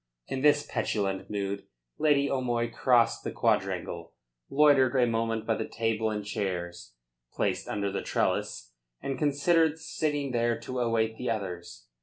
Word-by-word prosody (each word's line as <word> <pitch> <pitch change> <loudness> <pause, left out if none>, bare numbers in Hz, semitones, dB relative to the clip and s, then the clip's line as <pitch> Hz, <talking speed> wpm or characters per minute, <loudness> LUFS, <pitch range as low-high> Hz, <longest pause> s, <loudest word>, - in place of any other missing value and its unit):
In 130 - -3
this 145 0 +4
petulant 95 -2 -2
mood, 100 -1 -3 0.3
Lady 145 -2 +3
O'Moy 120 -3 -1
crossed 120 -1 +3
the - - -2
quadrangle, - - -1 0.3
loitered 140 -3 +5
a 125 -2 +5
moment 115 -1 -1
by 115 - +2
the - - -3
table 115 -1 0
and 105 -1 -3
chairs 90 - -4 0.4
placed - - -1
under 100 -1 -2
the 100 - -2
trellis, - - -1 0.3
and 135 -1 -4
considered 155 +2 +3
sitting 145 -3 -2
there 120 -1 +1
to 130 0 -4
await 115 -2 +1
the 125 - -2
others. 90 - -5
115 Hz, 145 wpm, -28 LUFS, 105-135 Hz, 0.4 s, loitered